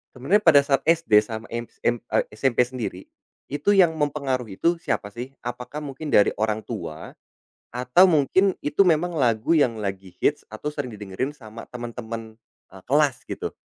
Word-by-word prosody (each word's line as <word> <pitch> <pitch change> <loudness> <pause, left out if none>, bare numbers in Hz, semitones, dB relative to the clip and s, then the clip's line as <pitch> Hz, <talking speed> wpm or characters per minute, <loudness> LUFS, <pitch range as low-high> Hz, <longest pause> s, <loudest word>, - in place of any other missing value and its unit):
sebenarnya 145 +12 +2
pada 145 -4 +8
saat 135 -1 +2
SD 165 -10 +5
sama 110 0 -6
MSA 120 0 -2 0.3
SMP 125 +2 +2
sendiri, 120 -7 -5 0.5
itu 145 +8 +2
yang 180 -4 +6
mempengaruhi 135 -7 -2
itu 170 +1 +2
siapa 130 -10 -3
sih? 125 +5 -7
Apakah 125 +5 -6
mungkin 145 +2 -7
dari 100 - +5
orang 110 0 0
tua, - - -7 0.6
atau 125 +9 +5
mungkin 180 +5 +3
itu 150 +7 +3
memang 175 +1 +2
lagu 115 +3 +1
yang 125 -7 +3
lagi 95 -2 -5
hit 150 - +2
atau 145 +7 -5
sering 145 -5 -5
didengerin 105 +7 -4
sama 115 -3 -11
temen-temen, 115 -2 -7 0.4
eee, 95 0 -13
kelas 145 -1 +2
gitu? - - -5
125 Hz, 155 wpm, -24 LUFS, 110-150 Hz, 0.6 s, pada